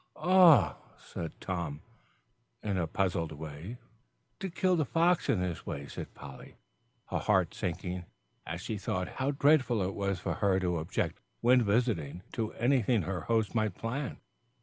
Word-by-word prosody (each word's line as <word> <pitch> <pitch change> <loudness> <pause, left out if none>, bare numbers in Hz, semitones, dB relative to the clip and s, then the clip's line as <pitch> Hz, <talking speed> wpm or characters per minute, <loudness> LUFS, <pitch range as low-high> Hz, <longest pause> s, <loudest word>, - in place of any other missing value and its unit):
"Eh?" 170 - +7 0.2
said 80 -2 -7
Tom, 85 -6 -4 0.8
in 100 -2 -1
a 85 -3 0
puzzled 90 -3 0
way. 80 +8 -7 0.6
"To 190 0 -3
kill 185 +1 +2
the 160 - +2
fox 170 +5 +2
in 100 - +3
this 90 -2 -3
way," 70 0 -5
said - - -8
Polly, 70 -2 -11 0.6
her - - 0
heart - - +2
sinking 90 +1 -3 0.4
as 85 +2 -5
she 105 +2 -4
thought 90 -1 -2
how 135 - +2
dreadful 140 -5 +3
it 95 +1 -2
was 100 -2 -1
for - - -2
her 95 -2 +2
to 90 -2 0
object, 80 - -2 0.2
when 125 +1 +5
visiting, 100 - 0
to 110 -2 -2
anything 120 -4 +2
her 90 -1 -3
host 110 +2 0
might 110 -5 0
plan. 125 +4 -3
100 Hz, 155 wpm, -31 LUFS, 85-125 Hz, 0.8 s, Eh